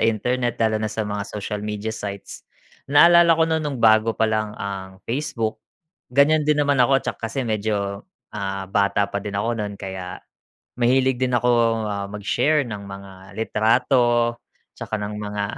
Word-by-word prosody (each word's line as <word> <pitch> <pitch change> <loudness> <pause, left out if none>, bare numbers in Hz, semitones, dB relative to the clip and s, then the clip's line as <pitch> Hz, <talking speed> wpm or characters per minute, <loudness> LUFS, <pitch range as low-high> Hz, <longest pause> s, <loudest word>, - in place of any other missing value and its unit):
internet 120 +2 0
lalo 110 -1 +1
na 110 - -1
sa 110 +1 -3
mga 105 0 -3
social 105 0 -5
media 105 +1 -4
sites. 100 -2 -7 0.4
Naalala 170 +3 +6
ko 160 - +3
noon 160 -1 0
noong 140 -4 -3
bago 110 0 +5
pa 110 - +2
lang 110 -1 -2
ang 95 -1 -6
Facebook, 115 -5 -2 0.5
ganyan 145 +4 +4
din 150 0 +2
naman 145 -2 +2
ako 135 +2 +4
tsak - - -3
kasi 120 +4 -3
medyo, 100 -2 -2 0.3
ah, 95 -1 -4
bata 100 +1 +1
pa 100 - -2
din 100 0 -4
ako 115 +4 0
no'n 105 -1 -4
kaya 95 -1 -6 0.6
mahilig 130 +1 +2
din 125 -1 +1
akong, 115 -2 +2
ah, 100 -1 -3
mag-share 125 +9 +1
ng 105 -3 -6
mga 100 0 -9 0.2
litrato 120 +2 +2 0.4
tsaka 110 - -5
ng 105 0 -5
mga 105 0 -3
110 Hz, 160 wpm, -22 LUFS, 100-125 Hz, 0.6 s, Naalala